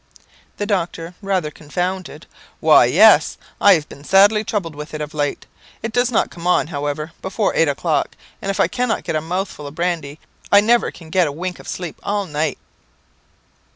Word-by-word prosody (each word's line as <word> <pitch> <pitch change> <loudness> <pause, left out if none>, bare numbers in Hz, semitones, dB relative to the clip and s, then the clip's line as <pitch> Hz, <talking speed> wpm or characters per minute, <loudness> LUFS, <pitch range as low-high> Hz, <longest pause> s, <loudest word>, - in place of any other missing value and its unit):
The 205 - -2
doctor, 175 -4 -2
rather 190 -6 -1
confounded 180 +5 -4 0.3
"Why, - - +6
yes; - - +5 0.2
I 200 -2 +7
have 155 -3 -3
been 140 - -13
sadly 205 +5 +5
troubled 195 -7 -3
with 150 +1 -8
it - - -4
of 150 0 -5
late. 145 -1 -2 0.4
It 225 0 -4
does 245 0 +2
not 240 - +1
come 170 0 -7
on, 180 - +3
however, 145 +1 -3
before 200 +2 -1
eight 165 - +3
o'clock, 150 +2 -1 0.3
and 195 - -4
if 195 - -2
I - - +4
cannot 250 -2 -1
get - - -3
a 155 - 0
mouthful 175 -2 -4
of 140 - -10
brandy, 165 -4 -2 0.3
I 200 - +8
never 235 +3 +3
can 160 -2 -13
get 180 -2 +3
a - - -3
wink 180 +5 -5
of - - -13
sleep 175 -3 -6
all 205 0 -1
night." 155 -2 -2
175 Hz, 190 wpm, -20 LUFS, 155-200 Hz, 0.4 s, I